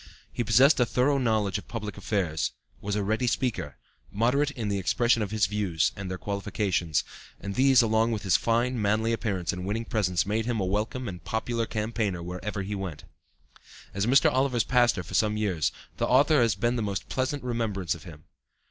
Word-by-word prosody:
He 120 - -1
possessed 130 +7 +5
a 125 - +4
thorough 135 +4 +2
knowledge 110 -5 +1
of - - -14
public 105 -3 -5
affairs, 90 -7 -1 0.3
was 100 0 -2
a 105 - 0
ready 110 +5 0
speaker, 105 - -2 0.3
moderate 125 +7 +2
in 120 -7 -5
the 100 -1 -1
expression 120 +4 +2
of 105 - -2
his 110 0 +2
views 95 -5 0
and 100 -2 -6
their 95 - -4
qualifications, 100 -5 -1 0.4
and 100 0 -5
these 130 +1 +5
along 110 +1 +2
with 110 -3 -3
his 95 -4 +3
fine, 120 +1 +1
manly 110 +2 +1
appearance 100 -7 -2
and 90 0 -5
winning 110 +4 -2
presence 90 -7 0
made 110 +3 -1
him 120 -3 0
a 95 - 0
welcome 110 +6 -2
and 90 -3 -7
popular 115 +1 -2
campaigner 105 -5 -2
whereever 90 +3 -4
he 100 +2 -4
went. 95 -7 -5 0.9
As 100 +2 -1
Mr. 135 +2 +5
Oliver's 130 -3 +2
pastor 120 -6 +2
for - - -11
some 105 -1 +2
years, 95 -8 0 0.3
the - - 0
author 145 +2 +4
has 115 -4 +2
the 120 +4 0
most 100 -3 -3
pleasant 130 +2 -2
remembrance 110 -7 -1
of 85 -3 -10
him. 80 -4 -12
105 Hz, 190 wpm, -27 LUFS, 95-120 Hz, 0.9 s, possessed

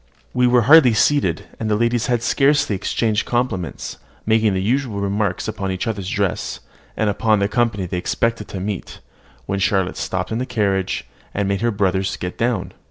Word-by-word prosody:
We 125 0 +3
were 120 -1 +4
hardly 135 -3 +7
seated, 145 +6 +2 0.2
and 110 - -2
the 105 - +2
ladies 120 +1 +1
had 120 -2 0
scarcely 140 -6 +2
exchanged 105 +2 0
compliments, 120 -8 -2 0.3
making 110 -2 +3
the - - 0
usual 120 -1 0
remarks 100 -1 -1
upon 100 -3 -3
each 95 +4 -3
other's 100 -5 -3
dress, 100 -2 -1 0.4
and 110 - +1
upon 110 +1 +2
the 100 0 +1
company 110 -3 0
they 90 0 -3
expected 115 +3 -1
to 95 - -6
meet, 100 -1 -5 0.5
when 100 - -2
Charlotte 95 -1 +1
stopped 110 - -2
the 125 +3 -1
carriage, 95 -3 0 0.3
and 100 -1 0
made 100 +1 -1
her 120 - +2
brothers 95 -3 0
get 90 0 -5
down. 115 -5 -1
105 Hz, 175 wpm, -20 LUFS, 95-120 Hz, 0.5 s, hardly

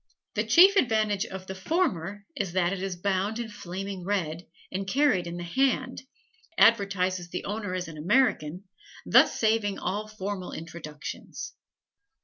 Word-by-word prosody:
The - - 0
chief 385 +4 +7
advantage 215 - +2
of 190 0 -7
the 190 - -5
former 200 - -1
is 190 -4 -2
that 180 0 +2
it 190 - -4
is 195 -1 -3
bound 195 +4 -1
in 235 -1 -4
flaming 195 -1 -6
red, 175 -4 -2 0.2
and 195 +1 -3
carried 215 -7 +2
in 170 0 -5
the 175 - -5
hand, 260 +6 0 0.6
advertises 185 -5 +3
the 180 - -5
owner 205 -2 -3
as 185 0 -3
an 160 -2 -9
American, 185 - +2 0.4
thus - - +5
saving 215 -3 +2
all 205 +4 -3
formal 200 -3 -5
introductions. 160 - -7
195 Hz, 145 wpm, -27 LUFS, 180-215 Hz, 0.6 s, chief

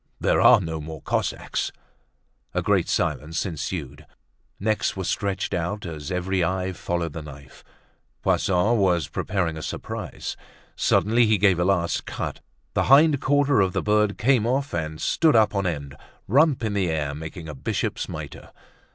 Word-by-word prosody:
"There - - +2
are - - +8
no 80 -1 -4
more 80 0 -7
Cossacks." - - -2 0.8
A - - 0
great - - +2
silence 80 +5 -1
ensued. 80 -4 -5 0.5
Necks 110 +2 0
were 95 - -2
stretched 100 +1 -2
out 90 +4 -2
as 80 -3 -6
every 90 0 0
eye 95 +1 -1
followed 85 -2 -3
the 85 - -5
knife. 70 -2 -12 0.6
Poisson 95 +6 +2
was 90 -6 +2
preparing 85 +1 -2
a - - -6
surprise. - - -5 0.4
Suddenly 115 +3 +3
he 110 -1 +3
gave 95 -3 +3
a 90 - +2
last 90 -3 0
cut; - - -4 0.3
the - - +1
hind 145 +1 +6
quarter 145 -4 +3
of 95 -2 +1
the - - -1
bird 105 -1 +2
came 120 -1 +3
off 135 +3 -1
and 80 -2 -3
stood 160 -5 +3
up 110 -2 +4
on 100 -2 0
end, 70 -5 -4 0.3
rump 140 +2 +3
in 110 -2 -1
the 95 -3 0
air, 75 -3 -1
making 80 +2 -7
a 75 - -6
bishop's 65 - -3
mitre. - - -8
95 Hz, 160 wpm, -24 LUFS, 80-105 Hz, 0.8 s, are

